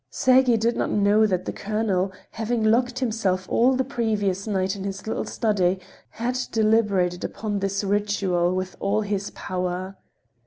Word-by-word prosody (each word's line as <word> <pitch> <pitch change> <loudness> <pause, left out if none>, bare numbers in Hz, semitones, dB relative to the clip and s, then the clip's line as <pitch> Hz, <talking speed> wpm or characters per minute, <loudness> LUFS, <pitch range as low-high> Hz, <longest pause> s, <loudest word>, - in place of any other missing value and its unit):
Sergey 255 -2 +4
did 230 +2 +1
not - - -1
know 210 +1 +4
that 185 -3 -1
the - - -3
colonel, 200 -3 -1 0.2
having 225 +1 -1
locked 245 +3 +2
himself 215 -7 -1
all 255 +3 +3
the 260 - +1
previous 215 -7 -1
night 190 -1 0
in 195 - -6
his 195 -1 -5
little 220 - -2
study, 190 -5 +1 0.3
had 245 +3 -2
deliberated 210 -5 +2
upon 205 0 -3
this 195 +1 -1
ritual 195 -3 +1
with 185 0 -3
all 205 +2 +1
his 205 -1 -2
power. 185 +1 -3
205 Hz, 155 wpm, -24 LUFS, 190-225 Hz, 0.3 s, Sergey